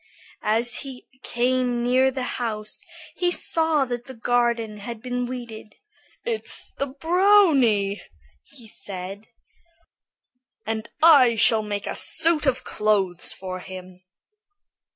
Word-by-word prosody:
As 230 Hz, +3 st, +1 dB
he 265 Hz, -2 st, -8 dB, 0.2 s
came 245 Hz, 0 st, 0 dB
near 255 Hz, +2 st, +3 dB
the 260 Hz, -1 st, -4 dB, 0.2 s
house, 215 Hz, -2 st, -4 dB, 0.4 s
he 355 Hz, -, +1 dB
saw 320 Hz, -4 st, +1 dB
that 245 Hz, -1 st, -5 dB
the 260 Hz, -, -10 dB
garden 235 Hz, -2 st, 0 dB
had 220 Hz, +2 st, -7 dB
been 245 Hz, +1 st, -3 dB
weeded. 235 Hz, -4 st, -8 dB, 0.5 s
"It's 460 Hz, -2 st, -4 dB
that 275 Hz, 0 st, -4 dB
brownie!" 320 Hz, -, +3 dB, 0.4 s
he 230 Hz, -, -16 dB
said; 195 Hz, 0 st, -8 dB, 1.4 s
"and 220 Hz, 0 st, -4 dB
I 275 Hz, -8 st, +7 dB
shall 220 Hz, 0 st, +4 dB
make 205 Hz, -1 st, -4 dB
a -, -, -4 dB
suit 320 Hz, -3 st, +2 dB
of 260 Hz, -2 st, +1 dB
clothes 195 Hz, -4 st, 0 dB
for 185 Hz, -1 st, -6 dB
him." 185 Hz, 0 st, -10 dB
240 Hz, 115 wpm, -24 LUFS, 215-265 Hz, 1.4 s, I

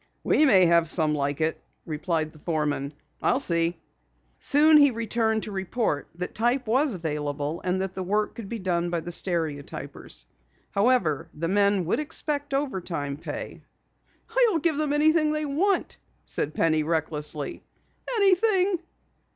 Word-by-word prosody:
"We 305 Hz, -, +4 dB
may 195 Hz, -9 st, +6 dB
have 170 Hz, -1 st, +4 dB
some 155 Hz, -3 st, +4 dB
like 145 Hz, 0 st, -1 dB
it," 160 Hz, +1 st, -1 dB, 0.2 s
replied 155 Hz, 0 st, -2 dB
the 155 Hz, -, -16 dB
foreman. 150 Hz, -3 st, -2 dB, 0.3 s
"I'll 255 Hz, -, +2 dB
see." 170 Hz, -8 st, 0 dB, 0.6 s
Soon 305 Hz, +2 st, +5 dB
he 285 Hz, -1 st, +7 dB
returned 225 Hz, -2 st, 0 dB
to 215 Hz, -, -6 dB
report 190 Hz, -4 st, -2 dB
that 180 Hz, +1 st, -5 dB
type 240 Hz, +3 st, +1 dB
was 255 Hz, +2 st, +2 dB
available 150 Hz, -2 st, -3 dB
and 185 Hz, 0 st, 0 dB
that 190 Hz, -1 st, -3 dB
the 190 Hz, -, -5 dB
work 210 Hz, +3 st, 0 dB
could 215 Hz, -4 st, -8 dB
be 235 Hz, -, -3 dB
done 175 Hz, -3 st, -1 dB
by 170 Hz, -1 st, -1 dB
the 175 Hz, -, -6 dB
stereotypers. 155 Hz, -, -4 dB, 0.5 s
However, 200 Hz, -, +1 dB
the 165 Hz, +2 st, -2 dB
men 200 Hz, -1 st, +2 dB
would 170 Hz, -, 0 dB
expect 290 Hz, -1 st, -3 dB
overtime 175 Hz, -, -2 dB
pay. 150 Hz, -, -7 dB, 0.9 s
"I'll 370 Hz, -, +1 dB
give 315 Hz, -1 st, +1 dB
them 305 Hz, -1 st, +1 dB
anything 305 Hz, +1 st, +3 dB
they 305 Hz, 0 st, -1 dB
want," 360 Hz, +8 st, 0 dB, 0.3 s
said 150 Hz, +1 st, -2 dB
Penny 155 Hz, -1 st, +2 dB
recklessly. 150 Hz, -2 st, -2 dB, 0.5 s
"Anything." 390 Hz, -2 st, +3 dB
185 Hz, 145 wpm, -26 LUFS, -, 0.9 s, he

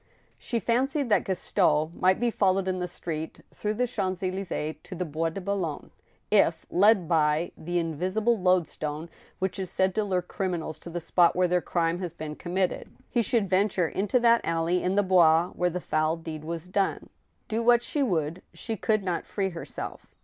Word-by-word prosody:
She 235 Hz, -, -2 dB
fancied 265 Hz, +4 st, 0 dB
that 210 Hz, -, +3 dB
Gaston 160 Hz, -4 st, +1 dB
might 185 Hz, +2 st, +2 dB
be 240 Hz, 0 st, +1 dB
followed 190 Hz, -2 st, +2 dB
in 185 Hz, -1 st, -1 dB
the 180 Hz, -, -2 dB
street, 160 Hz, -2 st, -5 dB
through 210 Hz, 0 st, -2 dB
the> 250 Hz, +3 st, +1 dB
Champs 190 Hz, -6 st, -2 dB
Elys^es, 185 Hz, -4 st, -3 dB
to 185 Hz, -, -9 dB
the 180 Hz, -, -2 dB
Bois 165 Hz, +1 st, -1 dB
de 165 Hz, -, -6 dB
Boulogne, 185 Hz, -5 st, -3 dB, 0.4 s
if, -, -, +3 dB
led 200 Hz, -1 st, +4 dB
by 155 Hz, 0 st, +2 dB
the 175 Hz, +2 st, -3 dB
in 165 Hz, -1 st, -1 dB
visible 200 Hz, +9 st, +1 dB
loadstone 170 Hz, -4 st, 0 dB, 0.3 s
which 190 Hz, +1 st, -2 dB
is 190 Hz, -2 st, -3 dB
said 190 Hz, 0 st, +1 dB
to 215 Hz, -, +1 dB
lure 185 Hz, -3 st, 0 dB
criminals 175 Hz, -4 st, -3 dB
to 170 Hz, -, -10 dB
the 175 Hz, +1 st, -3 dB
spot 170 Hz, +1 st, +3 dB
where 180 Hz, 0 st, +3 dB
their 180 Hz, 0 st, +2 dB
crime 170 Hz, 0 st, 0 dB
has 175 Hz, -3 st, -4 dB
been 155 Hz, -2 st, -6 dB
committed, 180 Hz, +2 st, -2 dB, 0.2 s
he 240 Hz, -, +2 dB
should 225 Hz, -1 st, +1 dB
venture 185 Hz, -2 st, +2 dB
into 205 Hz, +8 st, +1 dB
that 235 Hz, -1 st, +5 dB
alley 165 Hz, +2 st, 0 dB
in 185 Hz, +1 st, 0 dB
the 205 Hz, -, +4 dB
Bois 175 Hz, -2 st, +5 dB
where 180 Hz, 0 st, 0 dB
the 180 Hz, +1 st, -3 dB
foul 155 Hz, -1 st, 0 dB
deed 160 Hz, -2 st, -7 dB
was 165 Hz, +1 st, -5 dB
done. 195 Hz, +1 st, -1 dB, 0.4 s
Do 220 Hz, +1 st, -1 dB
what 240 Hz, 0 st, +4 dB
she 295 Hz, -, -1 dB
would, 170 Hz, -, 0 dB
she 225 Hz, -, -3 dB
could 215 Hz, +2 st, +1 dB
not 180 Hz, -3 st, -2 dB
free 195 Hz, -2 st, -1 dB
herself. 170 Hz, -, -7 dB
180 Hz, 195 wpm, -27 LUFS, 165-200 Hz, 0.4 s, that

